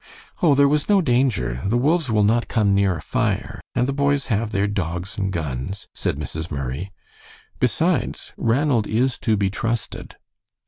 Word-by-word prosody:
"Oh, 155 -5 +5
there 140 +1 +5
was 150 +4 0
no 205 -1 +5
danger. 120 - +1
The 110 +5 +1
wolves 150 +3 +2
will 105 -2 +3
not 115 +3 +2
come 105 -4 +2
near 100 -2 +2
a - - -8
fire, 110 -2 -1
and 125 +1 +2
the 140 - -1
boys 140 0 +1
have 110 +1 -1
their 100 -1 +1
dogs 95 -2 -3
and 95 -1 -1
guns," 80 +4 -4
said - - -2
Mrs. 80 +3 -5
Murray; 70 +6 -4 0.7
"besides, - - 0
Ranald 120 -1 +1
is 120 +4 0
to 110 -1 +1
be 100 -1 +1
trusted." 115 +2 -4
105 Hz, 170 wpm, -22 LUFS, 95-130 Hz, 0.7 s, Oh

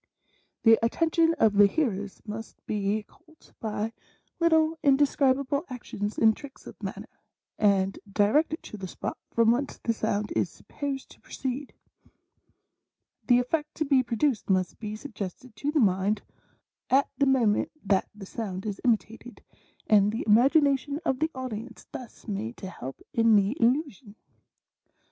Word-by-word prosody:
The 225 -1 +7
attention 330 +6 +2
of 220 -8 +3
the 205 0 +7
hear 270 +3 +1
ers 200 +1 -7
must 220 +1 -8
be 210 0 -1
caught 315 +9 -24
by 220 0 -3 0.5
little 320 -1 +3
indescribable 280 0 +2
actions 215 -4 -5
and 220 -1 +5
tricks 285 -2 -12
of - - -12
manner, - - -7 0.4
and 195 -2 +2
directed 290 +11 +2
to 215 - -8
the 190 -2 -6
spot - - -5
from 230 -1 +4
whence 275 +4 -1
the 230 - -1
sound 210 -1 -1
is - - +1
sup - - -21
posed 275 -2 -4
to - - -17
proceed; 265 +2 -5 1.5
the 245 -2 +6
effect 300 +5 -1
to 310 - -1
be 275 -2 +4
produced 240 -1 0
must 185 -1 +1
be 215 -1 -5
suggested 220 -1 -7
to 290 +6 -1
the 305 - +2
mind 200 -1 +2 0.7
at 275 +2 +4
the 280 - +4
moment 235 -6 +3 0.2
that 195 -1 +2
the 205 -2 -9
sound 190 -2 -5
is 205 -2 -4
imitated, 230 0 -1 0.4
and 205 -1 +4
the 225 - -3
imagination 280 +5 +4
of 260 -4 +1
the 315 - +1
audience 250 -3 -6
thus 245 -2 -10
made 215 +3 -4
to 190 -2 -7
help 130 -5 -8
in 230 -1 +5
the 200 +4 +3
illusion. 245 - 0
230 Hz, 150 wpm, -27 LUFS, 210-280 Hz, 1.5 s, The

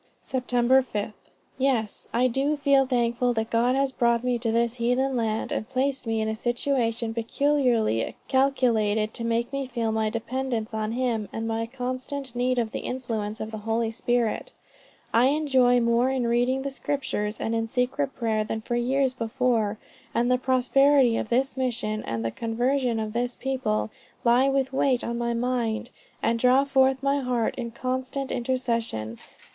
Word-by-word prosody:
"Sept. 255 -1 -4 0.4
5. 215 -2 -4 0.5
Yes, 250 -6 0
I 245 +2 +2
do 275 +5 0
feel 275 -2 +3
thankful 245 -1 +1
that 225 +1 -2
God 240 +2 +2
has 275 0 +1
brought 235 -2 +1
me 250 -1 0
to 230 -1 -1
this 235 +1 +1
heathen 250 +3 +1
land, 220 -2 -1
and 215 - -3
placed 265 -1 -1
me 225 0 0
in 220 - -1
a 220 - -1
situation 235 -1 -1
peculiarly 235 - +1
calculated 230 -6 +2
to 230 - -5
make 230 +2 -1
me 275 -1 -2
feel 235 -3 -1
my 220 0 0
dependence 230 0 -3
on 220 0 -2
him 235 -4 -1
and 225 0 -4
my 225 0 -1
constant 255 +1 -4
need 250 +1 +1
of 230 -2 0
the - - -3
influences 225 -4 -4
of 220 - -5
the 220 - -5
Holy 225 +1 -1
Spirit. 240 0 -1 0.6
I 235 +2 +5
enjoy 265 -4 +3
more 235 +2 +2
in 260 -2 0
reading 245 +3 +1
the 275 - -3
Scriptures, 265 -7 -3
and 225 - -2
in 225 0 0
secret 260 +3 -1
prayer 220 -3 0
than 220 +1 -4
for 240 - -3
years 260 +2 +1
before; 230 -3 0 0.4
and 240 +1 +2
the 250 - +3
prosperity 260 0 +4
of 220 - -2
this 260 +2 +1
mission, 230 -5 -1
and 115 0 -3
the 115 - -1
conversion 240 - 0
of 215 -1 -3
this 245 +1 -1
people, 255 -5 -1 0.3
lie 250 +3 +4
with 270 -1 0
weight 265 -2 +2
on 235 0 -3
my 235 0 -1
mind, 240 -1 -1 0.3
and 230 0 +1
draw 255 +3 +5
forth 265 -1 +2
my 280 +1 +2
heart 250 -4 0
in 240 -2 -4
constant 260 +3 -3
intercession. 235 - -2
240 Hz, 170 wpm, -26 LUFS, 225-260 Hz, 0.6 s, I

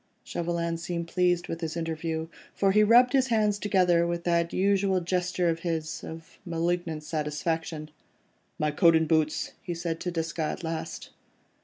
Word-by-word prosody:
Chauvelin 170 -1 -2
seemed 170 0 -4
pleased 180 -1 +1
with 165 +1 -5
his 165 0 -3
interview, 160 0 -3 0.3
for 195 -1 +3
he 210 +2 +5
rubbed 245 +4 +6
his 265 -1 +3
hands 210 -3 +2
together, 180 -5 +3
with 170 0 -2
that 170 -1 +1
usual 195 0 +2
gesture 180 0 0
of 165 0 +1
his, 165 -2 -3
of 160 0 -10
malignant 170 -2 -2
satisfaction. 155 +1 -3 0.7
"My 150 0 0
coat 165 +2 +5
and 160 0 +3
boots," 155 -1 +1
he 175 - -4
said 165 -1 -3
to 180 - -3
Desgas 165 -2 -2
at - - -9
last. 165 -1 -5
170 Hz, 160 wpm, -27 LUFS, 160-180 Hz, 0.7 s, rubbed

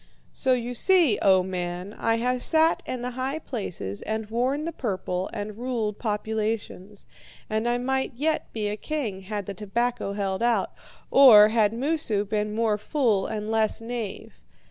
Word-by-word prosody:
"So 260 - +2
you 245 0 -2
see, 330 - +3
O 190 -2 +5
man, 180 +1 -4
I 225 0 0
have 250 +2 -1
sat 320 +3 +3
in 250 -1 -4
the 250 - -3
high 260 +4 -3
places, 195 - -5
and 220 0 -4
worn 260 +6 0
the 335 - -2
purple, 190 - -3
and 210 0 -6
ruled 230 -4 -2
populations. 210 -2 -3 0.5
And 220 +2 0
I 240 - +1
might 265 +2 -1
yet 310 +5 -1
be 215 -2 -2
a 205 - -2
king 225 -8 -4
had 205 +1 -5
the 200 - -5
tobacco 215 +2 -2
held 195 -1 -2
out, 235 0 +1 0.4
or 220 -6 +9
had 215 -2 +3
Moosu 235 -4 0
been 210 0 -2
more 220 -2 +1
fool 220 -5 +1
and 215 -1 -4
less 220 -1 +1
knave. 230 -3 -6
220 Hz, 165 wpm, -25 LUFS, 205-250 Hz, 0.5 s, or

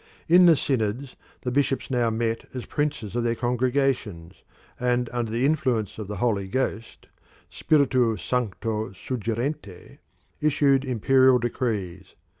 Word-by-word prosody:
In 175 +1 +7
the 165 - +7
synods 125 -1 -2 0.3
the 125 - -3
bishops 135 0 0
now 120 -2 +2
met 115 0 -2
as 125 - -5
princes 145 -8 -3
of 120 - 0
their 120 0 0
congregations, 120 -7 -1 0.4
and 125 0 +1
under 120 -2 -2
the 120 +3 0
influence 130 -9 0
of 105 - -5
the 105 - -5
Holy 100 -2 0
Ghost 115 0 -3 0.5
[spiritu 130 -7 +2
sancto 110 +3 -2
suggerente] 115 - -5 0.4
issued 145 -3 +3
imperial 130 +1 +4
decrees. 105 -7 -3
120 Hz, 125 wpm, -25 LUFS, 110-135 Hz, 0.5 s, In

